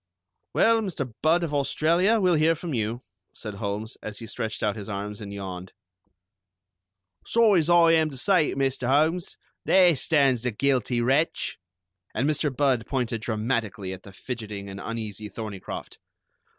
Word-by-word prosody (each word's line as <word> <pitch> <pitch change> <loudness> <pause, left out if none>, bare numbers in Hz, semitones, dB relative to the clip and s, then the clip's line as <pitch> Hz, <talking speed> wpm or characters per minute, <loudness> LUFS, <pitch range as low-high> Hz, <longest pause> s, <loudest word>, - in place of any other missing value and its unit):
"Well, 225 0 +4
Mr. 145 - -4
Budd 165 +3 +3
of 155 -3 -3
Australia, 165 +9 +2
we'll 185 -3 +3
hear 160 +1 +3
from 165 -1 -5
you," 115 +1 -2 0.3
said 105 -2 -7
Holmes, 105 +2 -4
as 105 -1 -6
he 115 - -7
stretched 110 0 -4
out 105 -2 +1
his 105 -1 -7
arms 100 +1 -5
and 100 -1 -7
yawned. 95 -2 -7 1.5
"Sorry 225 -5 +4
as 160 +1 0
I 170 -1 +6
am 160 -1 +3
to 135 - -8
say 180 +2 +3
it, - - -5
Mr. 135 -2 0
Holmes, 155 +6 +1 0.3
there 180 -3 +5
stands 135 -4 +2
the 125 - -1
guilty 125 0 0
wretch!" 135 +7 0 0.6
and 135 - +1
Mr. 150 0 +1
Budd 130 -3 +1
pointed 120 -4 -2
dramatically 110 -4 -2
at 95 - -9
the 100 - -13
fidgeting 105 -2 -6
and 95 - -8
uneasy 110 -2 -5
Thorneycroft. 100 -2 -7
125 Hz, 160 wpm, -26 LUFS, 105-160 Hz, 1.5 s, I